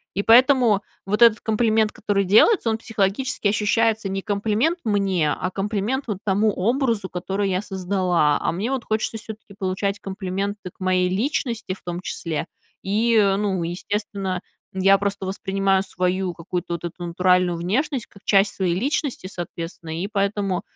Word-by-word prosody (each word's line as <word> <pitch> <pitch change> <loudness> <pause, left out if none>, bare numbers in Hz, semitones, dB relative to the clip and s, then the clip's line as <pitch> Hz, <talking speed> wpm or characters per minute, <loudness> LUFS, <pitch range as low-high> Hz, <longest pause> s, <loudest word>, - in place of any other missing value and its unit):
и 200 - 0
поэтому 240 -3 +5 0.2
вот 210 +3 -1
этот 230 -2 +6
комплимент, 220 -1 +2
который 200 -1 0
делается, 225 - +5
он 220 - 0
психологически 225 +2 -1
ощущается 220 +1 +1
не 195 0 -2
комплимент 215 - 0
мне, 195 -7 +1
а 185 - -3
комплимент 210 +7 -2
вот 210 -4 -2
тому 205 +2 +2
образу, 230 -1 0
который 195 +2 -2
я 185 0 0
создала. 185 -6 +1
А - - 0
мне 205 +9 -2
вот 265 -3 -2
хочется 220 +1 -1
всё-таки 220 -2 -10
получать 195 +1 -1
комплименты 195 0 -4
к - - -41
моей 185 -1 +2
личности, 230 0 -1
в 190 - -14
том 175 0 -4
числе, 160 -4 -4 0.4
и, 225 +4 +2 0.2
ну, 195 -3 -1
естественно, 190 +2 -3 0.3
я 195 +1 +4
просто 200 -1 -2
воспринимаю 195 0 0
свою 185 -1 -1
какую-то 175 +1 -4
вот 170 - -9
эту 175 +1 -6
натуральную 180 0 +2
внешность 235 - -1
как 200 - -19
часть 200 0 +3
своей 185 -3 0
личности, 280 -1 -1
соответственно. 165 -2 -6
И 195 - -2
поэтому, 200 -2 -1
200 Hz, 155 wpm, -23 LUFS, 185-220 Hz, 0.4 s, этот